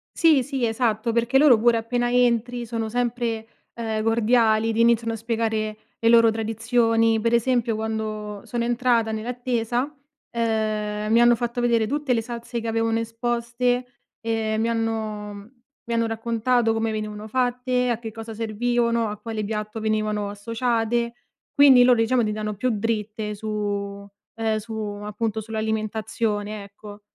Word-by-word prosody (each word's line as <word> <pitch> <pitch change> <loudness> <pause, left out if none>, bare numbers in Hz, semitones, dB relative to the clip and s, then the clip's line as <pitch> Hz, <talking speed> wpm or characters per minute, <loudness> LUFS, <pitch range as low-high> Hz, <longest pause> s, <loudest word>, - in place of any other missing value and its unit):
Sì, 320 -5 +5
sì, 270 -3 -2
esatto. 225 -1 0
Perché 235 +3 +2
loro 270 -5 +7
pure 235 +1 +4
appena 240 +2 -1
entri 245 0 +1
sono 225 -1 -3
sempre, 235 -1 -2 0.3
ehm, 220 -2 -3
cordiali, 225 0 +3
ti 225 - -2
iniziano 230 -1 +3
a - - -2
spiegare 220 -1 -2 0.2
le 230 - +3
loro 230 -1 +6
tradizioni. 225 0 +1
Pre 230 +2 +2
esempio 235 -1 +1
quando 215 -2 -4
sono 240 -1 -2
entrata 235 -1 +1
nell'attesa, 245 +3 -2 0.4
ehm, 215 -2 -1
mi 230 +1 +5
hanno 240 0 +6
fatto 240 +1 -2
vedere 235 -2 +2
tutte 290 0 0
le 230 - +1
salse 235 +1 -5
che 230 - -5
avevano 225 0 +1
esposte, 240 +2 -1 0.4
ehm, 225 -1 -1
e - - 0
mi 225 +1 +1
hanno, 220 -2 -2
mhmm, 205 +3 -12 0.3
mi 235 - -3
hanno 230 0 +1
raccontato 230 +1 +1
come 225 0 -1
venivano 215 0 -5
fatte, 250 +1 0
a 235 -2 0
che 225 -2 -6
cosa 225 +1 -8
servivano, 235 +1 0
a 210 - -5
quale 220 -1 -4
piatto 215 +1 -4
venivano 215 -1 -1
associate. 230 +2 -1 0.4
Quindi 270 -3 +7
loro 245 -1 +5
diciamo 235 +2 +2
ti 210 - 0
danno 215 0 -3
più 255 +6 0
dritte 215 -1 -2
su 205 -1 -4 0.3
ehm, 225 -1 0
su 220 +1 -7
appunto 210 +1 -3
sull'alimentazione, 215 -1 -2
ecco. 205 +1 -12
225 Hz, 155 wpm, -24 LUFS, 215-240 Hz, 0.4 s, loro